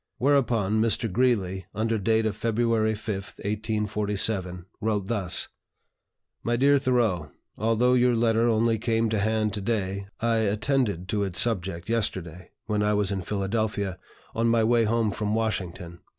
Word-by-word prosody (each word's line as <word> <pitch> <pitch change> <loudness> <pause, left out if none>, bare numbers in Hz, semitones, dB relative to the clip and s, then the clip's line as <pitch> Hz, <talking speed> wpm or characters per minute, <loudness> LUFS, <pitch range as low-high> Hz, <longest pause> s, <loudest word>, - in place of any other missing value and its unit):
Whereupon 115 -7 +2
Mr. 115 -1 +1
Greeley, 95 -6 0
under 110 +1 0
date 110 +2 +2
of 110 - -1
February 115 -1 +1
5, 110 +1 -4 0.2
1847, 105 -3 -1 0.2
wrote 105 -3 0
thus: 95 -5 -1 0.9
"MY 120 - 0
DEAR 140 +3 +4
THOREAU, 115 - +1 0.3
Although 115 +3 +2
your 125 -1 +3
letter 115 0 +2
only 115 0 +2
came 115 0 +1
to 110 -1 0
hand 110 0 0
to 105 - -3
day, 100 -2 -2
I 115 0 +1
attended 105 - 0
to 105 0 0
its 95 -2 -1
subject 95 -6 -1
yesterday, 95 -6 -2 0.2
when 105 -1 0
I 105 0 +2
was 105 -1 0
in 95 -1 -2
Philadelphia, 100 0 -2 0.3
on 115 +1 +1
my 115 -1 +3
way 115 0 +3
home 110 -1 +1
from 105 +1 -2
Washington. 90 -6 -3
110 Hz, 150 wpm, -26 LUFS, 100-115 Hz, 0.9 s, DEAR